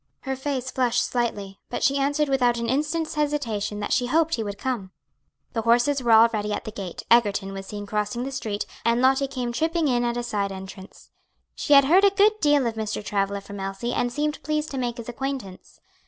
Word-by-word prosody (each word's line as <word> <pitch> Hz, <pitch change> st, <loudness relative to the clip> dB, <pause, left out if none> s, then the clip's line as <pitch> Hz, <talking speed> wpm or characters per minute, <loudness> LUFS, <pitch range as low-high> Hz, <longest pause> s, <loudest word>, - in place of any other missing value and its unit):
Her 265 Hz, -1 st, -3 dB
face 260 Hz, -1 st, -3 dB
flushed 250 Hz, -1 st, +1 dB
slightly, 205 Hz, -5 st, -3 dB
but -, -, -3 dB
she 275 Hz, +1 st, +3 dB
answered 290 Hz, +2 st, +1 dB
without 250 Hz, -3 st, +2 dB
an 235 Hz, 0 st, -2 dB
instant's 305 Hz, +5 st, -1 dB
hesitation 240 Hz, -9 st, -1 dB
that 205 Hz, -, -1 dB
she 245 Hz, -, +1 dB
hoped 325 Hz, +4 st, +2 dB
he 230 Hz, -, 0 dB
would 205 Hz, -1 st, -5 dB
come. 235 Hz, -5 st, -3 dB, 0.6 s
The 225 Hz, -, -1 dB
horses 240 Hz, +5 st, +3 dB
were 240 Hz, -2 st, +1 dB
already 220 Hz, -2 st, +5 dB
at -, -, -3 dB
the 220 Hz, -, -5 dB
gate, 195 Hz, -4 st, -7 dB
Egerton 205 Hz, -4 st, +3 dB
was 195 Hz, 0 st, -7 dB
seen 205 Hz, 0 st, -6 dB
crossing 210 Hz, +3 st, -2 dB
the 270 Hz, -, -4 dB
street, 215 Hz, -6 st, -3 dB, 0.2 s
and 235 Hz, +1 st, +2 dB
Lottie 265 Hz, +2 st, +3 dB
came 255 Hz, -3 st, -3 dB
tripping 320 Hz, +5 st, 0 dB
in 245 Hz, -2 st, +1 dB
at 240 Hz, 0 st, -1 dB
a 240 Hz, -, -2 dB
side 205 Hz, -4 st, -2 dB
entrance. 190 Hz, 0 st, -10 dB, 0.4 s
She 290 Hz, -, +1 dB
had 280 Hz, -1 st, +8 dB
heard 360 Hz, +7 st, +5 dB
a 400 Hz, -, +7 dB
good 405 Hz, +2 st, +4 dB
deal 290 Hz, -5 st, +3 dB
of 230 Hz, -, 0 dB
Mr. 215 Hz, -1 st, -4 dB
Travilla 200 Hz, 0 st, -1 dB
from 200 Hz, 0 st, -9 dB
Elsie, 195 Hz, +5 st, -3 dB
and 245 Hz, -, 0 dB
seemed 295 Hz, +3 st, -2 dB
pleased 305 Hz, 0 st, -2 dB
to 270 Hz, -, -3 dB
make 240 Hz, -2 st, -2 dB
his 235 Hz, -, -8 dB
acquaintance. 245 Hz, -6 st, -6 dB
240 Hz, 215 wpm, -24 LUFS, 210-275 Hz, 0.6 s, had